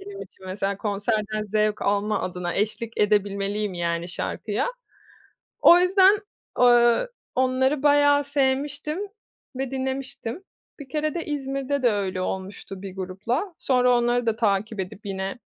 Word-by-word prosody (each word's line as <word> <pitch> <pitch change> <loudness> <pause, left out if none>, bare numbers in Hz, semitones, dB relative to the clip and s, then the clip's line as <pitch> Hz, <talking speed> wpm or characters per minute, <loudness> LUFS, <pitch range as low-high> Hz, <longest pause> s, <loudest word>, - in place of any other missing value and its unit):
benim 395 +1 -8
için 190 - -14
mesela 195 +1 -2
konserden 215 +1 -1
zevk 215 0 0
alma 205 +1 +1
adına 180 -1 -3
eşlik 220 +3 -2
edebilmeliyim 205 -1 +1
yani 170 0 -2
şarkıya. 205 +4 -2 1.0
O 345 - +8
yüzden 385 +2 +5 0.4
eee, 240 - +5 0.3
onları 260 +2 +1
bayağı 290 0 +5
sevmiştim 285 +3 -1 0.6
ve 265 -1 -3
dinlemiştim. 265 - -4 0.4
Bir 280 -2 -10
kere 305 +2 -1
de 340 - -3
İzmir'de 275 -1 -2
de 240 - +5
öyle 190 -3 -2
olmuştu 190 0 -5
bir 195 -1 -8
grupla. 200 - -3
Sonra 250 -2 +3
onları 240 0 +1
da 225 -1 +1
takip 215 -1 0
edip 190 +3 -6
yine 195 +3 -4
230 Hz, 130 wpm, -24 LUFS, 200-275 Hz, 1.0 s, O